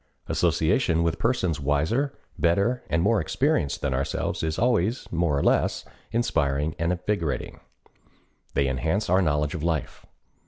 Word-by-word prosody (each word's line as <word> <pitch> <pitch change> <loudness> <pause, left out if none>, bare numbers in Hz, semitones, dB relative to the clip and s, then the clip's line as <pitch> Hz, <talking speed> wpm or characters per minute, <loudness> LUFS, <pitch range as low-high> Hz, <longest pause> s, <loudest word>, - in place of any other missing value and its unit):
Association 85 0 +2
with 85 -1 -1
persons 95 - 0
wiser, 80 - 0 0.2
better, 100 +9 +2
and 85 0 +1
more 110 +2 +3
experienced 130 - 0
than 70 -2 -1
ourselves 65 +2 -2
is 80 0 -2
always 115 -1 +1
more 85 -4 +1
or - - 0
less - - +1 0.3
inspiring 75 - 0
and 85 +1 +1
invigorating. 90 -4 -2 1.0
They 70 - +2
enhance 80 - -1
our 95 +1 +5
knowledge 75 -3 +1
of 80 - -4
life. 80 -2 -3
85 Hz, 135 wpm, -25 LUFS, 75-105 Hz, 1.0 s, our